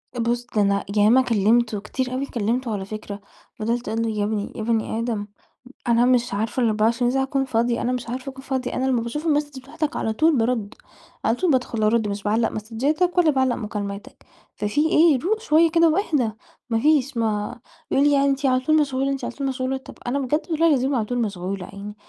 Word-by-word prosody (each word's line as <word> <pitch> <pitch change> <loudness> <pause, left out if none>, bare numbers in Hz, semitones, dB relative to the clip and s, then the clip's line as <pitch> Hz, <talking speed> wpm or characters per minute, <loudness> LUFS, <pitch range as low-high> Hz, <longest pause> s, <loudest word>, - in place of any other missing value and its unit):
أ - - -4
بُص، 240 +1 0
ده 210 - +4
أنا 200 0 +1
ياما 220 +6 +6
كلمته 225 -1 +2
كتير 255 +4 -3
أوي، 270 +2 -1
كلمته 235 0 -2
على 190 -2 -3
فكرة، 205 -1 -7 0.4
فضَلت 235 +3 -2
أقول 225 +1 -1
له، 225 - -1
يا 210 -1 -1
ابني 210 -1 -2
يا 220 - -4
بني 225 0 -1
آدم، 225 -3 -2 0.6
أنا 235 +1 +4
مش 245 -3 +2
عارفة 220 +5 -1
ال24 230 +2 +2
ساعة 265 0 +1
أكون 270 0 -1
فاضية، 235 -1 0
أنا 245 - 0
مش 245 -2 -4
عارفة 255 +2 -4
أكون 265 0 -12
فاضية. 260 -2 -3
أنا 260 - -1
لما 250 -3 +1
باشوف 295 +8 -4
الماسدج 290 -3 0
بتاعتك، 305 +2 -4
على 220 - -1
طول 310 +3 +3
بارُد، 225 -2 0 0.5
على 225 - +3
طول 355 +3 +1
بادخل 245 -4 0
أرُد، 220 0 +2
مش 200 0 -4
باعلّق 225 +2 +1
ماسدجاتك، 280 - -1
ولا 325 -3 +5
باعلّق 260 -2 +1
مكالماتك، 210 +4 -6 0.3
ففي 210 +8 0
إيه؟! 310 -5 +5
روق 435 - 0
شوية 330 -6 +3
كده 335 -1 +5
واهدي. 305 - +1 0.4
ما 225 -1 +1
فيش، 285 -2 +2
ما 220 +1 -1 0.3
يقول 275 - +3
لي - - +4
يعني 280 0 +3
أنتِ 275 +1 -1
على 255 -1 +3
طول 310 +4 +2
مشغولة، 270 -1 0
أنتِ 270 - -4
على - - -5
طول 275 -1 -3
مشغولة، 260 0 -2
طَب 265 - -12
أنا 275 +3 0
بجد 295 +6 -1
والله 325 +1 +3
العظيم 270 -2 +2
على 220 -3 0
طول 245 +2 -3
مشغولة 195 -2 -3
يعني، 200 +1 -9
245 Hz, 210 wpm, -23 LUFS, 220-275 Hz, 0.6 s, ياما